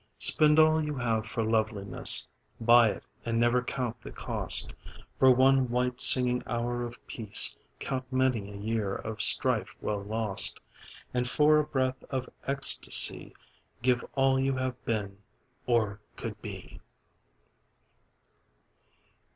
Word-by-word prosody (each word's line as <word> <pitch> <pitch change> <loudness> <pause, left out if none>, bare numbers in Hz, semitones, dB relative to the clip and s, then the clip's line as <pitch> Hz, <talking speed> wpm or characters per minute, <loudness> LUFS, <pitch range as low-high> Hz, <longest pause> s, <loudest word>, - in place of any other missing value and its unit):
Spend 150 0 +5
all 155 0 +3
you 150 -1 -5
have 115 -4 -3
for 115 0 -4
loveliness, 110 -3 0 0.3
Buy 120 0 +4
it - - -7 0.2
and 115 0 -3
never 120 +1 +1
count 125 -2 -6
the - - -11
cost; - - -2 0.5
For 130 - +5
one 130 0 +2
white 125 +1 -2
singing 125 -1 +6
hour 120 +1 -4
of 120 0 -8
peace 110 -4 +2 0.2
Count 130 -1 -6
many 130 -6 -1
a - - -11
year 105 -1 -4
of 110 -1 -7
strife 110 -3 0
well 105 -1 -4
lost, 105 -1 -1 0.5
And 125 0 -2
for 150 +3 +2
a - - 0
breath 130 -2 -3
of 130 -2 -5 0.2
ecstasy 140 0 +5 0.5
Give 125 -1 0
all 135 -1 +1
you 135 0 -1
have 130 -1 -5
been, 100 -3 -4 0.5
or 110 -4 -1
could - - -8
be. - - -11
125 Hz, 130 wpm, -27 LUFS, 110-130 Hz, 0.5 s, singing